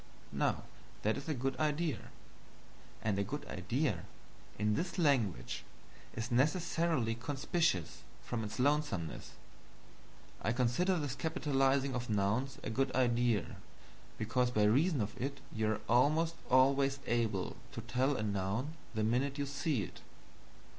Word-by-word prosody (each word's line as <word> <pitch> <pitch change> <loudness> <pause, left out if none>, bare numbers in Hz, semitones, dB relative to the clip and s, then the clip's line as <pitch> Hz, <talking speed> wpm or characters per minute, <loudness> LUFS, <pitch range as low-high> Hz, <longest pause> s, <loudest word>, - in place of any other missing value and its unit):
Now - - +1 0.4
that 110 +1 +2
is 140 +3 -6
a 155 - 0
good 135 +1 -1
idea; 155 -3 0 0.9
and 105 -2 +1
a - - +2
good - - -5
idea, - - -1 0.5
in 105 +1 +2
this 175 - -2
language, 110 - +1 0.5
is 115 +2 -3
necessarily 150 -2 +2
conspicuous 135 - 0 0.2
from 115 -2 -3
its 105 - -5
lonesomeness. 135 - 0 1.1
I 110 - +1
consider 130 +10 +2
this 145 -5 -2
capitalizing 135 -3 +1
of 120 -2 -3
nouns 110 +6 +1
a - - -3
good 135 +3 +1
idea, 120 -3 +2 0.6
because 125 +3 +1
by 110 -4 +2
reason 135 - +4
of 105 0 -3
it 140 +2 -2
you 110 -1 +1
are 110 - -1
almost 155 +7 +4 0.2
always 135 +1 +4
able 115 -6 0 0.2
to - - -4
tell 130 +2 +1
a 110 - -1
noun 100 +8 -1 0.2
the 110 - +1
minute 130 +6 +1
you 145 - 0
see 140 -4 -1
it. - - -9
130 Hz, 135 wpm, -34 LUFS, 110-145 Hz, 1.1 s, reason